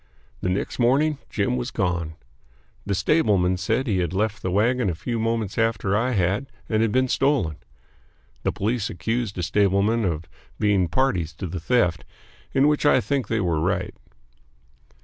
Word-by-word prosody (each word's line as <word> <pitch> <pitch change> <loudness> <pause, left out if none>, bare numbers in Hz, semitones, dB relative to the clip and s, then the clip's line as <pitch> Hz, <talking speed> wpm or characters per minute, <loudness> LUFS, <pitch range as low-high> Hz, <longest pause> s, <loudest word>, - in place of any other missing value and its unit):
The 90 - -1
next 90 +7 -2
morning 140 +5 +3
Jim 120 +4 0
was 125 0 -3
gone. 90 -7 -2 0.7
The 100 - 0
stableman 95 - +2
said 110 +8 0
he 100 -7 0
had 85 -2 -1
left 105 +2 -1
the 95 - -2
wagon 110 +4 +2
a 85 - -2
few 115 +7 -3
moments 115 -2 -1
after 115 -3 +1
I 125 +4 +1
had 100 +6 0 0.2
and 110 -1 +1
had 115 -2 +2
been 130 +3 +2
stolen. 130 - +1 0.8
The - - 0
police 110 +2 -1
accused 110 +4 -2
the 90 - -3
stablemen 100 +5 +2
of 85 -4 -2 0.3
being 100 -4 +2
parties 90 - 0
to 95 - -5
the 90 0 -4
theft, 90 -3 +1 0.5
in 135 +2 +3
which 150 -1 +1
I 145 -3 +5
think 135 -2 -1
they 110 0 0
were 85 -4 0
right. - - -1
105 Hz, 170 wpm, -24 LUFS, 90-125 Hz, 0.8 s, I